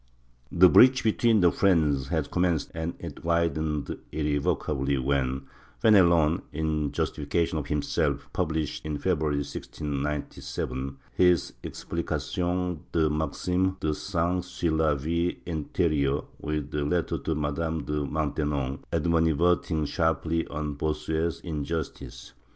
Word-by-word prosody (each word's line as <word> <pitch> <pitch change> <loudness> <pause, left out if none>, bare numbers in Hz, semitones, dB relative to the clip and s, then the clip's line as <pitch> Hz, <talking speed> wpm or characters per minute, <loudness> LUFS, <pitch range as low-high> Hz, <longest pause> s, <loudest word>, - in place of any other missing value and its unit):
The 90 +2 +7
breach 130 +7 +7
between 110 0 +3
the 90 -1 +5
friends 75 -8 +2
had - - -1
commenced 85 -3 +1
and 80 +1 -3
it 85 -3 -8
widened 80 -3 0
irrevocably 75 -2 0
when 65 0 0 0.4
Fenelon, 85 -7 +5
in 75 -1 -1
justification 80 +2 -1
of 70 - -5
himself, 75 -1 0
published, 80 -4 -1
in 75 -1 -3
February 75 -4 0
1697, 70 -2 -4 0.2
his 90 -2 +3
Explication 90 -1 -2
des 80 -2 +2
Maximes 90 +5 0
des 75 - 0
Saints 90 +1 -1
sur 90 -2 -1
la 80 -1 +2
Vie 85 +5 -1
interieure, 75 -3 0
with 75 -1 -3
a 75 - 0
letter 85 +4 0
to 80 - -2
Madame 75 +1 -2
de 75 0 -2
Maintenon 75 -2 -1
animad 80 -1 +2
verting 85 -3 +2
sharply 80 +1 0
on 75 0 -3
Bossuet's 80 +2 -2
injustice. 80 -1 -5
80 Hz, 115 wpm, -27 LUFS, 75-85 Hz, 0.4 s, The